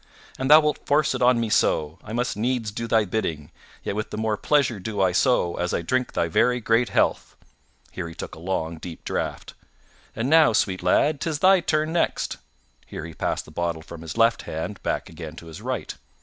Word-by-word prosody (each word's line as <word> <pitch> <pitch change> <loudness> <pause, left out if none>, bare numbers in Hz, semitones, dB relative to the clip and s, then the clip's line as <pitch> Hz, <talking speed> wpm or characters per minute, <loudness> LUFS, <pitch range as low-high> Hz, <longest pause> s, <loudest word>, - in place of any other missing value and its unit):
An 130 - -1
thou 155 +2 +9
wilt 150 -1 -1
force 145 0 +3
it 130 - -4
on 125 -1 +4
me 115 - 0
so, 80 -2 +1
I 110 - -9
must 120 +2 -1
needs 115 0 -1
do 115 +3 -4
thy 110 -1 +3
bidding, 85 -7 -3 0.3
yet - - -3
with 105 0 -3
the - - -6
more 110 -1 0
pleasure 125 0 +1
do 105 +2 -5
I 95 -2 +3
so 90 -3 +2
as 90 0 -1
I - - -2
drink 125 +8 -1
thy 85 - +1
very 125 +9 +2
great 115 0 +2
health - - 0 0.6
(here 90 -2 -5
he 80 - -11
took - - -7
a - - -10
long, 85 -2 -3
deep 80 0 -9
draught). - - -4 0.6
And 115 +3 -1
now, 155 -4 +6
sweet 95 -3 +1
lad, 145 - +2
'tis 160 -3 -1
thy 190 +4 +5
turn 155 -1 0
next 170 - 0 0.5
(here - - -7
he 80 - -9
passed - - -2
the - - -14
bottle 85 0 -2
from 85 0 -10
his 80 +5 -7
left 115 0 +3
hand 85 +6 -5
back - - -2
again - - -9
to - - -11
his 80 -1 -10
right). - - -3
110 Hz, 215 wpm, -24 LUFS, 85-130 Hz, 0.6 s, thou